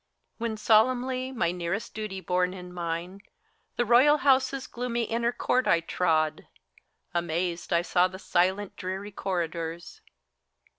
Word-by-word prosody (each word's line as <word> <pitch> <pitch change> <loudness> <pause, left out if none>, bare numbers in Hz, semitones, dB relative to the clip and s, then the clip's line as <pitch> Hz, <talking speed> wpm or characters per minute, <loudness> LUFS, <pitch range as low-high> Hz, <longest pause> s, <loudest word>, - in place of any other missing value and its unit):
When 225 -1 -2
solemnly, 255 +4 +2
my 195 -10 0
nearest 180 +4 -3
duty 210 -3 -5
borne 180 +1 0
in 180 -1 -9
mind, 175 +2 -4 0.5
The 240 - +1
Royal 255 +6 +6
House's 270 -1 +2
gloomy 240 -1 -2
inner 235 +1 0
court 250 +1 0
I 170 - +5
trod, 160 -2 0 0.7
Amazed 175 0 -2
I 170 0 +3
saw 180 +1 +3
the 185 0 -9
silent, 190 +2 0
dreary 190 +3 -5
corridors. 170 -3 -4
190 Hz, 130 wpm, -27 LUFS, 175-235 Hz, 0.7 s, Royal